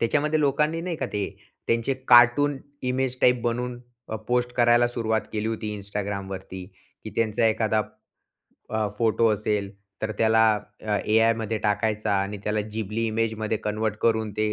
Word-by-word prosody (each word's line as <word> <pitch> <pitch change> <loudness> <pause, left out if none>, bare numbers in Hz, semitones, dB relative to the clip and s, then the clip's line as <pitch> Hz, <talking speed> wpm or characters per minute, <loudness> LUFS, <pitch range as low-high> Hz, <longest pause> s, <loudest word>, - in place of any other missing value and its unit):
त्याच्यामध्ये 150 +6 +1
लोकांनी 150 +3 +1
नाही 170 -1 -3
का - - -2
ते, 100 -2 -3 0.3
त्यांचे 115 +3 +1
कार्टून 125 +4 +6 0.3
इमेज 130 0 -1
टाइप 125 -1 +4
बनवून, 120 +1 -2 0.3
अ, 110 - -3
पोस्ट 125 0 +1
करायला 120 0 +4
सुरुवात 110 -2 0
केली 110 0 -1
होती 110 -1 -3
Instagramवरती, 100 -2 -5 0.4
की - - -6
त्यांचा 115 0 +2
एखादा, 110 -1 +1 0.9
अ, 110 -1 0
फोटो 115 0 +3
असेल, 105 -1 -1 0.3
तर 110 0 -1
त्याला, 110 0 +4 0.4
अ, 105 -1 -1
एआयमध्ये 110 0 +2
टाकायचा 105 0 0
आणि 100 +1 -5
त्याला 105 0 0
जिबली 110 +1 -2
इमेजमध्ये 110 0 -1
कन्व्हर्ट 105 0 -1
करून 110 -2 +2
ते 110 0 +1
110 Hz, 145 wpm, -25 LUFS, 105-120 Hz, 0.9 s, कार्टून